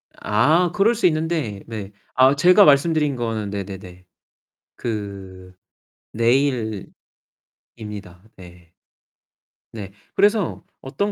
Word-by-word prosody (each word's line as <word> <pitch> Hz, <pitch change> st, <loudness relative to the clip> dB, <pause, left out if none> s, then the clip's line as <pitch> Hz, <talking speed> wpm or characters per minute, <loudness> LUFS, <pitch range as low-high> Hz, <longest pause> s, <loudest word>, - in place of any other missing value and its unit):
아 155 Hz, +12 st, +2 dB
그럴 210 Hz, +6 st, +2 dB
수 230 Hz, -, -1 dB
있는데 155 Hz, -, -2 dB
네. 105 Hz, -3 st, -7 dB, 0.2 s
아 130 Hz, +2 st, +5 dB
제가 180 Hz, +7 st, +6 dB
말씀드린 150 Hz, 0 st, +3 dB
거는 115 Hz, -4 st, -3 dB
네네네. 95 Hz, -2 st, -8 dB, 0.7 s
그 95 Hz, -4 st, -6 dB, 0.6 s
내일입니다. 115 Hz, -3 st, -1 dB, 1.3 s
네. 90 Hz, -2 st, -15 dB, 1.0 s
네. 100 Hz, -4 st, -7 dB, 0.2 s
그래서 205 Hz, -3 st, +1 dB, 0.2 s
어떤 150 Hz, +10 st, -2 dB
115 Hz, 180 characters per minute, -21 LUFS, 100-155 Hz, 1.3 s, 제가